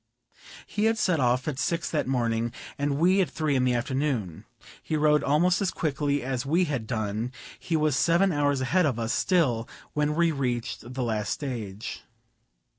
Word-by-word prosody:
He 210 - -1
had 225 0 +3
set 180 -6 +2
off 125 +1 +1
at 140 -3 -2
six 170 +4 -1
that 155 - 0
morning, 120 -3 0 0.2
and 140 0 -1
we 185 +5 +4
at 175 - 0
three 150 0 -1
in 130 -1 +2
the 125 -1 +2
afternoon. 120 - -2 0.4
He 155 - -2
rode 150 0 +3
almost 175 +7 +3
as 195 - +1
quickly 145 -4 -1
as 130 -1 -2
we 165 +6 +2
had 135 -8 -3
done; 110 +1 -2 0.3
he 165 -3 -1
was 155 -3 +2
seven 175 +6 +3
hours 145 -3 +1
a - - 0
head 180 +5 +3
of 130 -5 -1
us 115 0 -1
still 130 -11 +1 0.2
when 150 0 0
we 170 0 +3
reached 125 -3 -3
the 130 - -1
last 110 -3 -1
stage. 115 -8 -4
140 Hz, 185 wpm, -27 LUFS, 120-160 Hz, 0.4 s, we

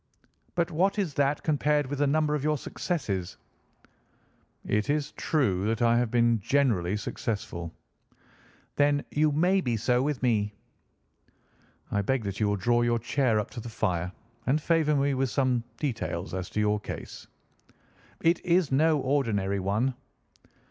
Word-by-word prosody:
"But 170 0 0
what 190 +6 +1
is 190 -8 -1
that 140 +1 +1
compared 150 -1 +2
with 140 +1 -4
the 145 - +3
number 150 +1 +2
of 150 -2 -1
your 150 0 +1
successes?" 100 - -3 1.3
"It 105 +3 0
is 150 0 0
true 105 - 0
that 110 0 0
I 115 0 +4
have 120 -2 0
been 120 -1 +3
generally 105 -6 +1
successful." 90 -6 -4 1.1
"Then 145 0 +2
you 150 +1 +2
may 180 +6 +3
be 120 -6 -1
so 125 +3 +2
with 140 -2 -2
me." 105 -4 +1 1.4
"I 100 - +1
beg 130 +4 0
that 100 -1 -4
you 105 - +2
will 100 - +1
draw 120 +4 +2
your 120 0 +2
chair 115 -1 +1
up 105 - -4
to 125 - -7
the 120 +1 -7
fire 90 -5 -1 0.4
and 140 +4 +3
favour 155 -1 +2
me 140 0 +2
with 135 0 0
some 125 -2 +1
details 130 - -3
as 95 -1 -4
to - - -3
your 105 0 +2
case." - - -8 0.9
"It 165 +2 +2
is 175 -3 +2
no 155 +3 +4
ordinary 110 -8 0
one." 105 +8 0
130 Hz, 155 wpm, -28 LUFS, 105-150 Hz, 1.4 s, I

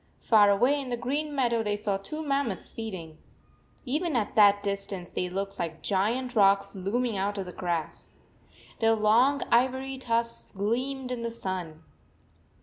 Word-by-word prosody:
Far 210 -3 +6
away 250 +8 +3
in 265 - -7
the 240 - -2
green 290 +5 -2
meadow 235 -4 +2
they 210 -1 -1
saw 205 -1 -1
two 305 +11 -6
mammoths 275 -8 -1
feeding. 185 -8 -7 0.7
Even 305 +4 -1
at 220 -4 0
that 205 -1 +5
distance 200 -3 -4
they 180 - -2
looked 195 +2 -4
like 165 -2 -4
giant 235 +6 0
rocks 200 -1 +4
looming 215 +4 -1
out 200 +2 -1
of 195 - -3
the 180 - -7
grass. 175 -3 -4 0.6
Their 225 0 +4
long 235 +7 +3
ivory 260 +2 +1
tusks 230 -2 -1
gleamed 250 +6 -2
in 245 -2 -3
the 235 - -2
sun. 185 -8 -5
220 Hz, 155 wpm, -28 LUFS, 195-255 Hz, 0.7 s, Far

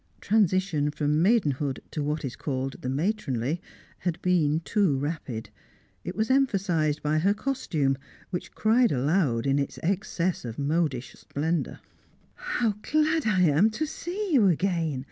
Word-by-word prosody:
Transition 185 -7 +2
from 150 +1 0
maidenhood 150 - +2
to 155 - -3
what 150 0 -2
is 125 -3 -5
called 135 -1 -4
the 130 - -3
matronly 150 - -1 0.4
had 175 -2 -2
been 160 -4 +2
too 185 -6 +1
rapid; 140 -6 -4 0.5
it 180 - -5
was 220 +3 0
emphasised 185 - +1
by 150 +1 +2
her 200 +5 +2
costume, 165 - 0 0.4
which 180 - -5
cried 230 +2 +3
aloud 135 -3 +1
in 140 +1 +2
its 140 - -3
excess 185 -1 -1
of 115 -2 -6
modish 145 -4 -1
splendour. 160 +4 -3 0.5
"How 230 -4 -1
glad 310 0 +1
I 190 -4 +3
am 170 +5 +5
to 225 +8 -2
see 360 +5 -4
you 230 -8 +6
again!" 170 -5 +1
165 Hz, 145 wpm, -27 LUFS, 145-205 Hz, 0.5 s, you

